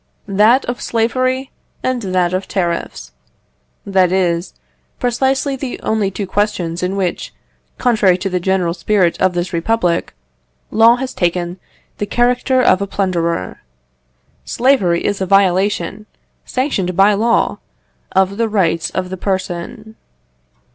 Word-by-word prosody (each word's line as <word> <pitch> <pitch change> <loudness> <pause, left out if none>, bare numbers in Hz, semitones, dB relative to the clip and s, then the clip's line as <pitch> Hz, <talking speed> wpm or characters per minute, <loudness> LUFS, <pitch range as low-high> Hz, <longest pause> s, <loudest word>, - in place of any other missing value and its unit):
That 215 +7 +4
of 245 0 -4
slavery 255 +3 0 0.3
and 255 -1 -1
that 185 -3 0
of 185 +1 -2
tariffs; 170 - -3 0.7
that 190 -3 +2
is, 175 -2 0 0.4
precisely 265 +3 0
the 265 -1 -5
only 215 -3 0
two 195 +1 -4
questions 185 -4 -1
in 180 +2 -1
which, 190 -3 -2 0.5
contrary 215 -7 +3
to 190 - -3
the 185 -1 -1
general 180 -2 0
spirit 180 0 +1
of 185 -1 +3
this 175 +1 -2
republic, 175 -1 0 0.6
law 225 +2 +6
has 255 +1 -5
taken 175 0 -1 0.4
the 205 - -2
character 250 +3 +2
of 185 - +4
a 200 - -1
plunderer. 170 - -2 0.8
Slavery 220 -10 +2
is 200 -1 -1
a 190 - -1
violation, 195 +1 +1 0.4
sanctioned 200 - -1
by 200 +2 +5
law, 230 +3 +1 0.5
of 190 +1 +1
the 230 -1 0
rights 170 -6 +1
of 185 -1 -4
the 190 - -4
person. 195 +4 -4
195 Hz, 130 wpm, -17 LUFS, 180-230 Hz, 0.8 s, law